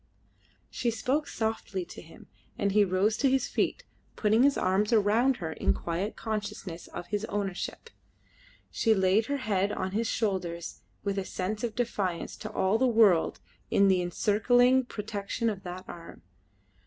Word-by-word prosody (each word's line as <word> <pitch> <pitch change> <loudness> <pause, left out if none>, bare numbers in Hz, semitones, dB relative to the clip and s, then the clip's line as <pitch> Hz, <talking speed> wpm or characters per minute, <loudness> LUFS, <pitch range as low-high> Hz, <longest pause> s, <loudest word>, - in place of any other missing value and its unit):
She 240 - -1
spoke 260 +6 -1
softly 220 -4 -3
to - - -10
him, 165 - -15 0.3
and 200 -1 +1
he 210 +1 +5
rose 195 +3 +2
to 275 - +3
his 265 -1 +1
feet, - - -1 0.3
putting 215 +2 +3
his 280 +1 +4
arm 190 +2 +2
round 230 +4 +3
her 160 -3 -4
in - - +1
quiet 175 +5 -3
consciousness 210 -5 -5
of - - -7
his 205 0 -1
ownership; 205 - -4 0.8
she 225 -1 +2
laid 190 +4 +3
her 285 - -1
head 205 -5 0
on 185 -2 -3
his 220 +3 0
shoulder 185 -7 -1 0.4
with 200 -1 -1
a - - -2
sense 195 +4 -4
of 230 -3 -2
defiance 200 -8 -2
to - - -7
all 195 +4 +1
the 260 - +4
world 215 -8 +4 0.3
in 200 0 +4
the 185 -1 +3
encircling 245 +8 +3
protection 215 +1 -3
of 195 -2 -7
that 185 +1 -7
arm. 170 - -10
205 Hz, 160 wpm, -29 LUFS, 185-230 Hz, 0.8 s, he